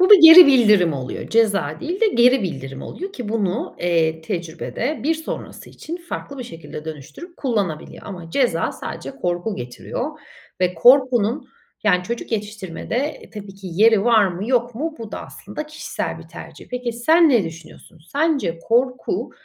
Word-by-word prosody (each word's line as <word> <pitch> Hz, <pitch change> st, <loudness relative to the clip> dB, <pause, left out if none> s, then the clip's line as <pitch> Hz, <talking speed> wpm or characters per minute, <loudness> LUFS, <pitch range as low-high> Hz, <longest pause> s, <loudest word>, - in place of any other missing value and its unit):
Bu 370 Hz, -, +4 dB
da 415 Hz, -, +13 dB
geri 330 Hz, -1 st, +11 dB
bildirim 210 Hz, -, +5 dB
oluyor. 130 Hz, -3 st, -6 dB
Ceza 200 Hz, -10 st, +1 dB
değil 350 Hz, +5 st, -4 dB
de 455 Hz, -, +5 dB
geri 250 Hz, -, +4 dB
bildirim 135 Hz, -6 st, -5 dB
oluyor 385 Hz, +3 st, -7 dB
ki 245 Hz, -, -6 dB
bunu, 210 Hz, -4 st, -2 dB
eee, 165 Hz, -2 st, +1 dB
tecrübede 170 Hz, -, -4 dB
bir 320 Hz, +3 st, +1 dB
sonrası 320 Hz, 0 st, -7 dB
için 335 Hz, +2 st, -7 dB
farklı 340 Hz, -5 st, -7 dB
bir 250 Hz, -, -5 dB
şekilde 165 Hz, -7 st, -9 dB
dönüştürüp 160 Hz, -, -10 dB
kullanabiliyor. 200 Hz, -, -3 dB
Ama 175 Hz, -5 st, -8 dB
ceza 180 Hz, -8 st, +1 dB
sadece 135 Hz, -, -7 dB
korku 175 Hz, +9 st, -3 dB
getiriyor. 125 Hz, 0 st, -5 dB, 0.5 s
Ve 180 Hz, 0 st, +1 dB
korkunun 250 Hz, -, +4 dB, 0.4 s
yani 180 Hz, -4 st, +3 dB
çocuk 235 Hz, +5 st, -5 dB
yetiştirmede 210 Hz, -, -4 dB
tabii 200 Hz, -2 st, -9 dB
ki 195 Hz, -1 st, -9 dB
yeri 215 Hz, +3 st, +4 dB
var 225 Hz, -4 st, +5 dB
mı 185 Hz, +4 st, -4 dB
yok 245 Hz, -2 st, +1 dB
mu 310 Hz, +6 st, -3 dB
bu 225 Hz, -2 st, -8 dB
da -, -, -5 dB
aslında 305 Hz, -, -8 dB
kişisel 305 Hz, +1 st, -5 dB
bir -, -, -13 dB
tercih. -, -, -11 dB
Peki, 250 Hz, -1 st, -3 dB
sen 315 Hz, +9 st, +4 dB
ne 240 Hz, -9 st, +3 dB
düşünüyorsun? 165 Hz, 0 st, -11 dB
Sence 285 Hz, -, 0 dB
korku, 250 Hz, +2 st, 0 dB
225 Hz, 160 wpm, -21 LUFS, 175-270 Hz, 0.5 s, da